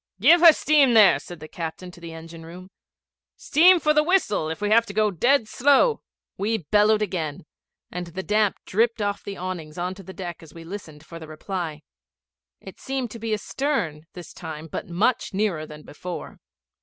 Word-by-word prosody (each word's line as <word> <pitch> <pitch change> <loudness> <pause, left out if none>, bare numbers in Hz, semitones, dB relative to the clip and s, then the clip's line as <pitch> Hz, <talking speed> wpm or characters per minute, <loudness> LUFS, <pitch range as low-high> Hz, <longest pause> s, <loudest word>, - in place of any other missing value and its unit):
'Give 320 - +6
her 340 -1 +10
steam 285 -5 +3
there!' 210 -3 +6
said 175 -2 -11
the 155 - -9
captain 170 +3 -7
to 175 - -16
the 170 -1 -8
engine 165 0 -11
room. 180 +3 -12 0.6
'Steam 350 +4 +5
for 305 -1 +2
the 300 - +4
whistle, 300 - +1
if 160 - -5
we 205 0 -1
have 230 +1 +6
to 200 - -8
go 215 -1 +2
dead 240 - +2
slow.' 285 - +3 0.4
We 220 +3 0
bellowed 210 +4 +2
again, 165 -4 -4 0.5
and 180 0 -5
the 185 +3 -6
damp 210 0 +1
dripped 230 +3 +1
off 205 -1 -2
the 200 - -7
awnings 175 -4 -6
on 180 +1 -3
to 190 - -12
the 190 - -11
deck 180 -3 -7
as 165 -1 -15
we 165 - -10
listened 165 -4 -10
for 165 0 -10
the 160 - -10
reply. 155 -1 -5 0.8
It - - -12
seemed 265 -4 -4
to 230 - -9
be 225 0 -4
astern 210 - -2
this 175 -2 -11
time, 160 -2 -8
but 165 - -7
much 205 +4 0
nearer 190 -7 -1
than 150 0 -12
before. 175 +4 -8
190 Hz, 195 wpm, -24 LUFS, 165-225 Hz, 0.8 s, her